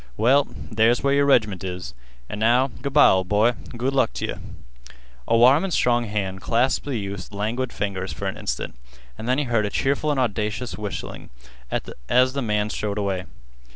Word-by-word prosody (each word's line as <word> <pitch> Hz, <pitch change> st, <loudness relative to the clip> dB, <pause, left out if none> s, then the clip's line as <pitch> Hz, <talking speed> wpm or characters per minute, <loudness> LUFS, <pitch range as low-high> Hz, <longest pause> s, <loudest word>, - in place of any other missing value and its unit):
"Well, 135 Hz, +5 st, +4 dB, 0.2 s
there's 115 Hz, +3 st, +3 dB
where 140 Hz, 0 st, +3 dB
your 140 Hz, 0 st, +3 dB
reg'ment 105 Hz, -8 st, +2 dB
is. 90 Hz, -8 st, -5 dB, 0.3 s
An' 105 Hz, -, -6 dB
now, 120 Hz, +5 st, +3 dB
good 140 Hz, -, -3 dB
by, 150 Hz, -, +7 dB
ol' 95 Hz, 0 st, +3 dB
boy, 105 Hz, +5 st, +3 dB, 0.3 s
good 130 Hz, +3 st, -1 dB
luck 135 Hz, -, +2 dB
t' -, -, -3 dB
yeh." -, -, -4 dB, 0.9 s
A 115 Hz, -, +3 dB
warm 130 Hz, +7 st, +6 dB
and 195 Hz, -, -2 dB
strong 120 Hz, -5 st, +2 dB
hand 95 Hz, -3 st, -3 dB
clasped 125 Hz, +3 st, +1 dB
the 135 Hz, -4 st, -1 dB
youth's 100 Hz, -2 st, -6 dB
languid 115 Hz, +5 st, -2 dB
fingers 95 Hz, -3 st, -3 dB
for 80 Hz, -, -6 dB
an -, -, -2 dB
instant, -, -, -4 dB, 0.4 s
and 115 Hz, -, -6 dB
then 130 Hz, -, +2 dB
he 150 Hz, -, +1 dB
heard 115 Hz, -5 st, +1 dB
a -, -, -3 dB
cheerful 140 Hz, +6 st, 0 dB
and 145 Hz, -2 st, +1 dB
audacious 115 Hz, 0 st, -2 dB
whistling 105 Hz, -2 st, -6 dB, 0.8 s
as 125 Hz, -, +3 dB
the 140 Hz, -, -2 dB
man 105 Hz, -2 st, 0 dB
strode 105 Hz, -1 st, -3 dB
away. 95 Hz, -3 st, -2 dB
115 Hz, 190 wpm, -23 LUFS, 105-130 Hz, 0.9 s, by